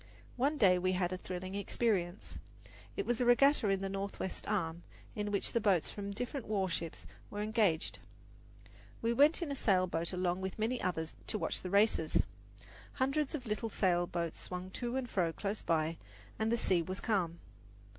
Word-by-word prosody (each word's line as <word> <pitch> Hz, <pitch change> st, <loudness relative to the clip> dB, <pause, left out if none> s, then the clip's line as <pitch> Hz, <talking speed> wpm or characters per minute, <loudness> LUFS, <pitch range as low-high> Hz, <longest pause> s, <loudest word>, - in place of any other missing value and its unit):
One 280 Hz, +5 st, +1 dB
day 185 Hz, -7 st, +5 dB
we 185 Hz, +1 st, +1 dB
had 180 Hz, 0 st, 0 dB
a -, -, -2 dB
thrilling 185 Hz, +1 st, -5 dB
experience. 200 Hz, -2 st, -1 dB, 0.6 s
There 400 Hz, -, -2 dB
was 240 Hz, 0 st, 0 dB
a -, -, +3 dB
regatta 245 Hz, -1 st, +5 dB
in 195 Hz, -1 st, +1 dB
the 195 Hz, -, -1 dB
Northwest 195 Hz, -1 st, -4 dB
Arm, 170 Hz, -5 st, -1 dB, 0.3 s
in 210 Hz, -1 st, -2 dB
which 200 Hz, -, +1 dB
the 235 Hz, -, +1 dB
boats 195 Hz, -6 st, +2 dB
from 200 Hz, -1 st, -5 dB
the 200 Hz, -, -5 dB
different 245 Hz, +2 st, -4 dB
warships 190 Hz, -5 st, -2 dB, 0.2 s
were 205 Hz, 0 st, -3 dB
engaged. 210 Hz, -6 st, +1 dB, 1.0 s
We 230 Hz, +1 st, +2 dB
went 295 Hz, +7 st, +5 dB
in 300 Hz, -, -3 dB
a -, -, -1 dB
sail 190 Hz, -7 st, +3 dB
boat 170 Hz, -1 st, -1 dB
along 180 Hz, 0 st, 0 dB
with 190 Hz, 0 st, -4 dB
many 230 Hz, +3 st, 0 dB
others 160 Hz, -3 st, -1 dB
to -, -, 0 dB
watch -, -, -1 dB
the 185 Hz, -, -5 dB
races. 200 Hz, -5 st, +3 dB, 0.7 s
Hundreds 275 Hz, +3 st, 0 dB
of 260 Hz, -4 st, -6 dB
little 220 Hz, +1 st, -2 dB
sail 175 Hz, -4 st, +2 dB
boats 170 Hz, -2 st, -3 dB
swung 180 Hz, +1 st, -5 dB
to 240 Hz, +4 st, -3 dB
and 265 Hz, -2 st, -1 dB
fro 180 Hz, -7 st, +1 dB
close 200 Hz, +5 st, -3 dB
by, 160 Hz, 0 st, 0 dB, 0.4 s
and 220 Hz, +1 st, +1 dB
the 235 Hz, -, +3 dB
sea 185 Hz, -6 st, +2 dB
was 185 Hz, +3 st, -4 dB
calm. 180 Hz, -7 st, 0 dB
195 Hz, 185 wpm, -34 LUFS, 180-230 Hz, 1.0 s, day